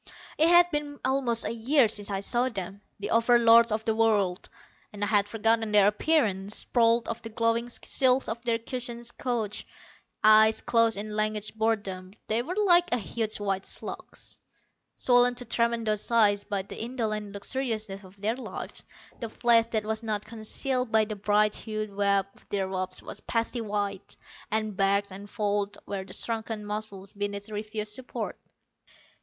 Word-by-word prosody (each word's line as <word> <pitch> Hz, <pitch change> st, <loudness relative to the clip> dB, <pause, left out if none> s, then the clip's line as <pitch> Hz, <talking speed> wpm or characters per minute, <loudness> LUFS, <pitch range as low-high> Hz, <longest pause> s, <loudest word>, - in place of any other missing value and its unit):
It 320 Hz, +2 st, +4 dB
had 350 Hz, 0 st, +6 dB
been 295 Hz, -1 st, -3 dB
almost 260 Hz, -3 st, +2 dB
a -, -, -2 dB
year 245 Hz, +3 st, +3 dB
since 205 Hz, -1 st, 0 dB
I 195 Hz, -1 st, -2 dB
saw 245 Hz, +5 st, +1 dB
them, 195 Hz, -2 st, -6 dB, 0.2 s
the 205 Hz, -, -4 dB
Over 230 Hz, +1 st, +5 dB
Lords 230 Hz, 0 st, +6 dB
of 215 Hz, +1 st, -2 dB
the 220 Hz, -, +2 dB
World, 210 Hz, -5 st, +1 dB, 0.4 s
and 205 Hz, -1 st, -6 dB
I -, -, +4 dB
had 205 Hz, -1 st, +2 dB
forgotten 225 Hz, 0 st, +1 dB
their 205 Hz, -2 st, +6 dB
appearance. 210 Hz, -4 st, +1 dB
Sprawled 230 Hz, -1 st, +2 dB
on 230 Hz, -, -3 dB
the 225 Hz, -, -7 dB
glowing 230 Hz, +1 st, 0 dB
silks 260 Hz, +1 st, +1 dB
of 225 Hz, +2 st, -4 dB
their 235 Hz, -2 st, +1 dB
cushioned 240 Hz, 0 st, -5 dB
couches, 225 Hz, -5 st, -2 dB, 0.6 s
eyes 215 Hz, +1 st, +6 dB
closed 230 Hz, -2 st, +2 dB
in 210 Hz, +1 st, -5 dB
languid 215 Hz, 0 st, 0 dB
boredom, 200 Hz, -4 st, -2 dB
they 220 Hz, +2 st, 0 dB
were 345 Hz, +9 st, -5 dB
like 355 Hz, -4 st, +4 dB
huge 220 Hz, -1 st, -1 dB
white 195 Hz, -2 st, -2 dB
slugs. -, -, -7 dB, 0.6 s
Swollen 245 Hz, 0 st, +4 dB
to 245 Hz, 0 st, -3 dB
tremendous 230 Hz, -2 st, 0 dB
size 210 Hz, -3 st, +3 dB
by 200 Hz, -2 st, -2 dB
the 200 Hz, -, -9 dB
indolent 215 Hz, -4 st, -3 dB
luxuriousness 215 Hz, -2 st, -3 dB
of 190 Hz, +1 st, -16 dB
their 215 Hz, +3 st, 0 dB
lives, 260 Hz, -, -7 dB, 0.4 s
the 230 Hz, -, -4 dB
flesh 230 Hz, 0 st, +3 dB
that 220 Hz, -2 st, -1 dB
was 220 Hz, 0 st, -2 dB
not 215 Hz, -2 st, -3 dB
concealed 230 Hz, +3 st, -2 dB
by 220 Hz, -1 st, +4 dB
the 215 Hz, 0 st, -5 dB
bright 210 Hz, +1 st, +2 dB
hued 215 Hz, -2 st, -5 dB
web 200 Hz, -1 st, +2 dB
of -, -, -23 dB
their 195 Hz, -2 st, -1 dB
robes 185 Hz, -1 st, -2 dB
was -, -, -6 dB
pasty 230 Hz, +1 st, -2 dB
white, 205 Hz, -2 st, -3 dB, 0.3 s
and 215 Hz, -1 st, -1 dB
bagged 200 Hz, +1 st, +1 dB
and 200 Hz, +2 st, -9 dB
folded 205 Hz, -1 st, -1 dB
where 195 Hz, -1 st, -4 dB
the -, -, -8 dB
shrunken 225 Hz, -2 st, -3 dB
muscles 205 Hz, -2 st, -4 dB
beneath 205 Hz, +1 st, -4 dB
refused 210 Hz, 0 st, -4 dB
support. 255 Hz, +3 st, -6 dB
220 Hz, 165 wpm, -27 LUFS, 205-235 Hz, 0.6 s, had